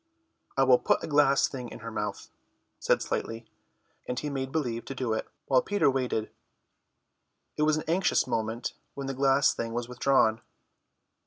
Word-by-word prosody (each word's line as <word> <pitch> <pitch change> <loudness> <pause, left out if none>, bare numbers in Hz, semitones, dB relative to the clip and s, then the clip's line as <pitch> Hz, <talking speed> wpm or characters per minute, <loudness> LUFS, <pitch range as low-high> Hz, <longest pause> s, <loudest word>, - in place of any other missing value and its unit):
"I 135 - +5
will 130 -2 +6
put - - +1
a - - -3
glass 145 -2 +4
thing 125 -3 -7
in - - -10
her 115 +1 -6
mouth," 105 -1 -4 0.5
said - - +2
Slightly, 115 +1 -3 0.6
and 125 - -3
he 150 +2 -3
made 135 -1 -3
believe 120 -7 -2
to 135 - -6
do 125 -3 -1
it, 110 - -3 0.2
while 130 -2 +4
Peter 205 -8 +2
waited. 125 -4 -1 1.2
It - - -3
was 155 0 +3
an 155 - -3
anxious 180 +4 +2
moment 115 +2 -2 0.2
when 140 - -5
the 135 - -3
glass 135 +1 +3
thing 115 0 -4
was 120 0 -2
withdrawn. 125 -3 +2
130 Hz, 170 wpm, -28 LUFS, 115-140 Hz, 1.2 s, will